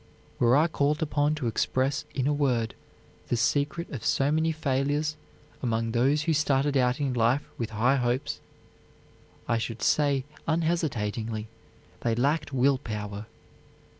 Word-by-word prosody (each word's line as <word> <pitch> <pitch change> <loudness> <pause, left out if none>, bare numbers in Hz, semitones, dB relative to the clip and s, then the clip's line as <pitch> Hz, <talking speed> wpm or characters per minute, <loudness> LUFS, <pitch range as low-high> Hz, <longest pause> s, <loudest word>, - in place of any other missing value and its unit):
Were 120 +2 +5
I 155 - +5
called 150 0 0
upon 150 0 +1
to 150 -4 -4
express 130 +5 0
in 130 - 0
a 145 - +2
word 125 -6 +1 0.5
the 120 - 0
secret 145 +7 0
of 125 -7 -6
so 135 +1 +2
many 160 +1 +2
failures 145 0 0 0.5
among 115 -2 0
those 135 +6 +2
who 165 0 +1
started 145 -1 +2
out 125 0 +2
in 140 -3 0
life 120 +4 +2 0.2
with 115 -2 -2
high 120 +5 +2
hopes, 125 +1 -1 1.1
I 115 - +1
should 115 0 -4
say 140 -3 +2 0.2
unhesitatingly, 115 -10 -1 0.5
they 115 -1 0
lacked 145 +6 +1
will 135 0 +3
power. 105 -2 -5
135 Hz, 140 wpm, -27 LUFS, 115-150 Hz, 1.1 s, Were